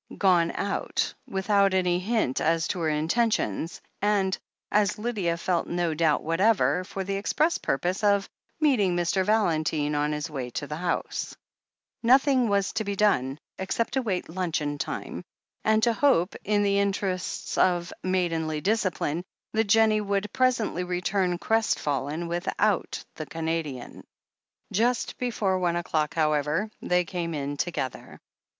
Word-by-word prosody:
Gone 175 -4 +4
out, 200 0 -1
without 195 0 +2
any 180 -1 +2
hint 205 - 0
as 165 +1 +2
to 180 - -2
her 160 -2 +1
intentions, 160 - 0 0.2
and, 200 -2 +2 0.4
as 210 -1 +2
Lydia 210 -7 -1
felt 170 0 0
no 175 -2 0
doubt 155 -2 +2
whatever, 185 +2 +2
for 190 +1 -5
the 195 +1 -2
express 300 +11 +1
purpose 180 +9 -1
of 200 -1 +3 0.3
meeting 235 - +3
Mr. 175 +2 +1
Valentine 155 -8 +1
on 150 0 +1
his 150 +2 -2
way 135 -6 -5
to 145 - -4
the 150 +1 -5
house! 175 +1 -3 0.6
Nothing 255 0 +4
was 200 -1 +1
to 220 - -1
be 200 -1 -3
done, 140 -10 +2 0.2
except 190 +4 -1
to 265 - +2
await 200 -8 -2
luncheon 160 -4 -2
time - - -4 0.4
and 220 0 +3
to 235 - +4
hope, 225 -9 +2
in 205 0 +2
the 200 0 +2
interests 195 -2 -2
of 175 -1 +2
maidenly 165 -4 0
discipline, 180 -4 0 0.3
that 220 +1 +2
Jennie 215 0 +4
would 200 0 -2
presently 245 -8 +1
return 180 0 0
crestfallen 160 - 0
without 170 +1 -1
the - - -7
Canadian. 160 -6 -4 0.7
Just 235 +3 0
before 210 -6 0
one 175 -2 +1
o'clock, 155 -3 -1
however, 155 +5 +1
they 180 0 +1
came 170 -1 -3
in 145 0 -3
to 175 - 0
gether. 130 -7 -5
185 Hz, 145 wpm, -26 LUFS, 165-210 Hz, 0.7 s, Gone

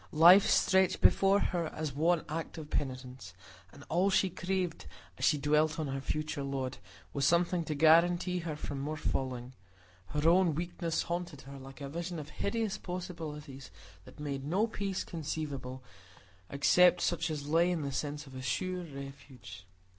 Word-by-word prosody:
Life 175 +6 +8
stretched 190 -1 +3
before 195 +1 +4
her 175 -4 -1
as 155 -3 -4
one 165 +3 +2
act 160 +2 -5
of 155 -1 -8
penitence; 130 -6 -4 0.4
and 145 - -13
all 180 +4 +2
she 190 -1 +2
craved, 185 -1 -3 0.3
as - - -5
she 150 - +4
dwelt 150 +2 +2
on 155 - -1
her 135 0 -3
future 155 +1 -3
lot, 135 -2 -3 0.3
was 140 - -1
something 170 +3 +3
to 155 - -3
guarantee 175 +4 +4
her 165 -3 -4
from 145 -2 -5
more 150 +3 -3
falling; 130 -3 -3 0.5
her 150 +2 0
own 175 -2 +4
weakness 170 0 -2
haunted 170 -4 -4
her 140 0 -10
like 135 +1 -12
a 140 - -4
vision 170 +4 -5
of 150 -1 -7
hideous 210 +5 -2
possibilities, 155 -7 -7 0.4
that - - -15
made 140 -2 -4
no 180 +10 +1
peace 200 -4 -3
conceivable 145 -5 -5 0.7
except 180 +5 +4
such 165 -1 0
as 145 -2 -4
lay 165 +3 +3
in 170 -4 -1
the 140 - -3
sense 145 +2 -3
of 135 - -13
a 130 - -7
sure 180 +9 -2
refuge. 135 - -10
155 Hz, 165 wpm, -31 LUFS, 140-175 Hz, 0.7 s, Life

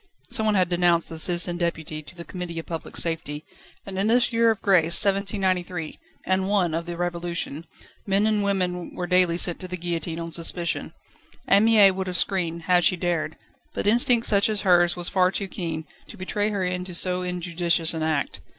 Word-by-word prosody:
Someone 220 -1 +1
had 185 -2 +3
denounced 175 -1 +1
the 160 - -5
Citizen 175 +1 +2
Deputy 160 -3 -3
to 155 - -15
the 170 -1 -9
Committee 180 -2 -6
of 165 - -5
Public 165 -2 -6
Safety; 160 -3 -3 0.4
and 190 -1 -5
in 200 - +1
this 240 +1 +2
year 230 0 +4
of 220 - 0
grace, 170 -4 +4
1793, 185 -4 -1 0.3
and 190 0 +1
I. 200 -2 +2
of 165 +1 -4
the 170 -1 -5
Revolution, 170 -3 -4 0.4
men 200 +2 +2
and 215 -1 +1
women 180 -3 -2
were 180 - -3
daily 180 -1 +3
sent 175 -1 +2
to 185 - -5
the 180 0 -5
guillotine 170 -1 -4
on 165 0 -6
suspicion. 170 +1 -2 0.5
Anne 200 +2 +5
Mie 215 -4 +6
would 190 0 -4
have 180 -1 -2
screamed, 170 -4 -1
had 180 0 +3
she 185 - +4
dared, 170 -3 -2 0.4
but - - -3
instinct 235 +2 +4
such 200 0 +3
as 215 -2 0
hers 175 -2 +4
was 175 -1 -1
far 185 -1 +2
too 195 +1 -3
keen, 165 -4 -5 0.2
to 220 - -12
betray 205 +2 -2
her 200 -3 -2
into 180 0 -3
so 180 +1 +1
injudicious 175 -2 -1
an 160 - -4
act. 155 -3 -1
180 Hz, 195 wpm, -24 LUFS, 170-195 Hz, 0.5 s, Mie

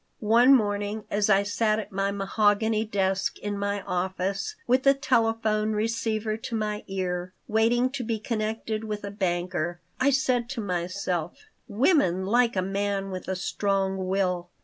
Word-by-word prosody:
One 245 +4 +7
morning 205 -1 -1
as 205 0 +1
I 200 -1 +5
sat 215 +1 +1
at 220 - -5
my 195 +1 0
mahogany 205 +2 +1
desk 195 -2 0
in 205 0 -4
my 200 0 -2
office, 190 - -2
with 255 +2 +3
the 275 +1 +5
telephone 225 -5 +1
receiver 215 0 -1
to 225 +1 -5
my 210 -1 -2
ear, 185 -1 -3
waiting 235 +3 +2
to 265 -2 -4
be 225 -1 -1
connected 220 0 -3
with 210 -1 -4
a 200 - -5
banker, 175 -3 -2 0.2
I 265 - +4
said 255 -3 +1
to 270 -3 -4
myself: 180 -3 -3 0.2
"Women 205 - +2
like 235 +3 +3
a 185 - +1
man 195 0 -2
with 185 -1 -6
a 190 - -1
strong 190 0 -1
will. 180 -2 0
205 Hz, 155 wpm, -26 LUFS, 190-225 Hz, 0.2 s, One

